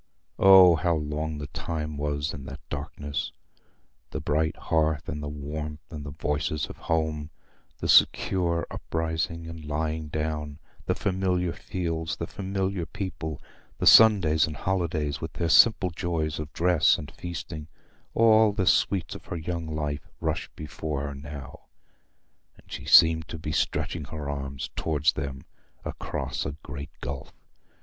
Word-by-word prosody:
Oh 95 -3 +9
how 85 -1 +1
long 75 0 -3
the 75 - -5
time 80 0 -4
was 75 +1 -2
in 70 -1 -8
that 70 +2 -10
darkness! 70 0 -4 0.8
The - - -4
bright 80 +2 0
hearth 80 -1 0
and 75 -1 -4
the 75 - -4
warmth 75 +1 -6
and 75 -3 -6
the 75 - -6
voices 75 +1 -1
of - - -10
home, 80 -2 -1 0.5
the - - -3
secure 85 -3 +4
uprising 80 +1 -2
and 80 -1 -8
lying 75 +1 -2
down, 75 -1 -3 0.3
the - - +2
familiar 90 -3 0
fields, 80 -3 -3
the - - -4
familiar 95 -2 -2
people, 80 -6 -5 0.4
the - - -2
Sundays 95 -10 +7
and 75 - -6
holidays 80 -5 -1
with 80 - -5
their 85 -1 -1
simple 95 +2 +6
joys 80 -3 -2
of 75 0 -5
dress 85 0 +4
and 75 0 -8
feasting—all 90 +7 0
the 100 -3 0
sweets 95 -1 +2
of - - -10
her 85 - -4
young 85 0 -4
life 75 -1 -3
rushed - - -3
before 75 -1 -4
her 70 -1 -4
now, 70 0 -9 0.9
and - - -21
she - - -6
seemed 80 -1 +7
to 80 - -6
be 75 -1 -4
stretching 75 +1 -1
her 75 -2 -6
arms 70 +2 -5
towards 80 -1 +1
them 65 -1 -5 0.4
across - - -3
a 70 +1 -4
great 70 0 -7
gulf. 65 0 -5
80 Hz, 145 wpm, -27 LUFS, 75-85 Hz, 0.9 s, Oh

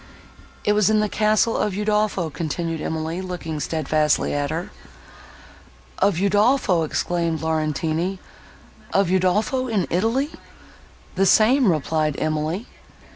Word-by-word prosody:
"It 210 - +2
was 210 -1 +3
in 215 -1 +3
the 210 - +1
castle 215 +2 +2
of 205 -3 -1
Udolpho," 210 -5 0
continued 165 +2 -3
Emily, 160 +3 -3
looking 175 -4 -5
steadfastly 155 0 0
at 145 0 -1
her. 165 +3 -4 1.3
"Of 200 -2 +3
Udolpho!" 205 -1 +3
exclaimed 165 +1 -1
Laurentini, 160 +3 -1 0.8
"of 195 -2 +2
Udolpho 210 +8 +1
in 210 -7 0
Italy!" 230 - 0 0.8
"The 195 +1 +2
same," 230 +2 +5
replied 155 -1 0
Emily. 155 +7 -2
180 Hz, 115 wpm, -22 LUFS, 160-210 Hz, 1.3 s, same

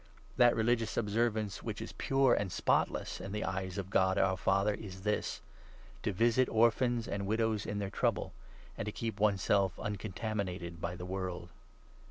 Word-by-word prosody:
That 120 -1 +5
religious 115 0 +1
observance 110 -1 0
which - - -4
27 - - -4
is - - -10
pure 135 -2 +4
and 100 -3 0
spotless - - 0
in 95 +1 -6
the 105 - -2
eyes 95 0 -3
of 95 -1 -4
God 95 0 +3
our 95 -1 +3
Father 95 +2 +2
is 95 -2 -8
this 105 0 -1 0.3
— - - -22
to 105 - 0
visit 115 +6 +3
orphans 115 +1 +2
and 100 -1 -3
widows 110 -1 0
in 105 - -2
their 100 -1 -3
trouble, - - 0 0.4
and 105 - -4
to - - -1
keep 110 -1 -4
one 105 -1 +3
self 95 -1 +2
uncontaminated 100 -4 -4
by 85 +1 -2
the 90 0 -7
world. 90 -2 -4
100 Hz, 180 wpm, -33 LUFS, 95-110 Hz, 0.4 s, That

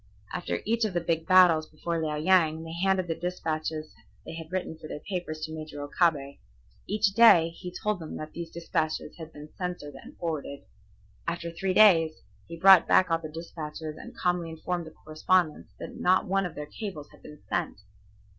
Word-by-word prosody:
After - - -3
each 230 +1 +1
of 210 -5 -1
the - - +3
big 165 -1 -1
battles 180 -4 +6
before 165 +1 -3
Liao 155 -1 -1
Yang 160 -1 +3
they 165 0 -7
handed 190 +1 +1
the 165 - 0
despatches 155 -3 -4 0.3
they - - -7
had 165 0 -8
written 185 -3 -3
for 155 0 -11
their - - -6
papers 175 -5 -5
to 160 0 -5
Major 155 -2 -7
Okabe. 145 -2 0 0.5
Each 210 -1 +1
day 195 -7 +7
he 180 +2 -9
told 210 +2 -2
them 160 -2 -7 0.2
these 170 -1 -6
despatches 160 -2 -3
had 160 -1 -9
been 150 0 -11
censored 175 -5 -4
and 135 - -13
forwarded. 155 -4 -4 0.6
After 170 0 -3
three 185 +3 -2
days 165 -7 +5 0.2
he 170 - -8
brought 190 -2 +8
back 185 -2 +4
all 165 - +2
the 155 -2 -7
despatches 155 -1 -7
and - - -11
calmly 175 -2 0
informed 170 +1 -4
the 160 - -13
correspondents 155 +1 +1
that - - -8
not 185 +1 +2
one 195 0 +1
of - - -12
their 150 - -5
cables 155 -3 -7
had - - -19
been 150 - -12
sent. 175 -1 -2
165 Hz, 185 wpm, -28 LUFS, 155-180 Hz, 0.6 s, brought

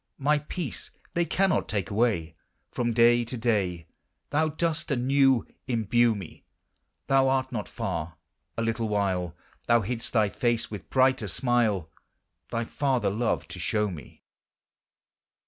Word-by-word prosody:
My 150 +1 +2
peace 150 0 -4 0.2
they 170 0 +1
cannot 190 +1 +1
take 100 -2 -2
away; 100 -7 +1 0.4
Prom 120 -1 -1
day 120 +1 +5
to 120 +2 -5
day 100 -8 0 0.5
Thou 155 +2 +2
dost 160 +1 -1
anew 135 -2 +3 0.2
imbue 120 -1 +2
me; 95 -5 -9 0.6
Thou 135 -1 +4
art 130 0 0
not 110 -5 -3
far; 80 0 -4 0.4
a 115 - 0
little 115 -1 -1
while 95 -5 0 0.3
Thou 120 0 +5
hid'st 115 +2 -2
thy 110 -4 +3
face, 120 +3 0
with 100 -4 -8
brighter 130 -4 +3
smile 110 - +1 0.6
Thy 115 0 -2
father 130 -7 0
love 110 +3 -1
to 90 - -7
show 105 +4 0
me. 75 -8 -11
115 Hz, 135 wpm, -27 LUFS, 100-130 Hz, 0.6 s, day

